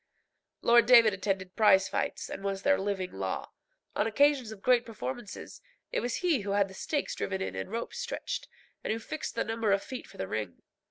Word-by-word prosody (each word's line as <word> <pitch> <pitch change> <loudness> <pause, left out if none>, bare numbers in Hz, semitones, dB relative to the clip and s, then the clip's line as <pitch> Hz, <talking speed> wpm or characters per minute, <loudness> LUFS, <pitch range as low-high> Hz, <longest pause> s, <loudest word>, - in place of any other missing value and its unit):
Lord 235 -1 +6
David 235 -4 +8
attended 190 -1 -2
prize 190 -4 +5
fights, - - -2
and 195 - -7
was 195 -1 -2
their 285 0 +4
living 195 -2 -2
law. 95 -1 -4 0.4
On 210 - +2
occasions 275 0 +3
of 205 -3 -10
great 250 -1 +4
performances 235 -1 -7 0.3
it - - 0
was 245 -1 -2
he 325 -7 +3
who 200 -1 -3
had 200 -1 +2
the - - -11
stakes 290 +9 -2
driven 190 -1 -2
in 190 - -3
and - - -4
ropes 230 - -4
stretched, 485 0 -4 0.4
and - - -1
who 220 - 0
fixed 300 +7 -5
the - - +1
number 225 -2 0
of 200 0 +2
feet 255 - -7
for - - -15
the 95 - -3
ring. 105 -4 -4
215 Hz, 205 wpm, -30 LUFS, 195-240 Hz, 0.4 s, David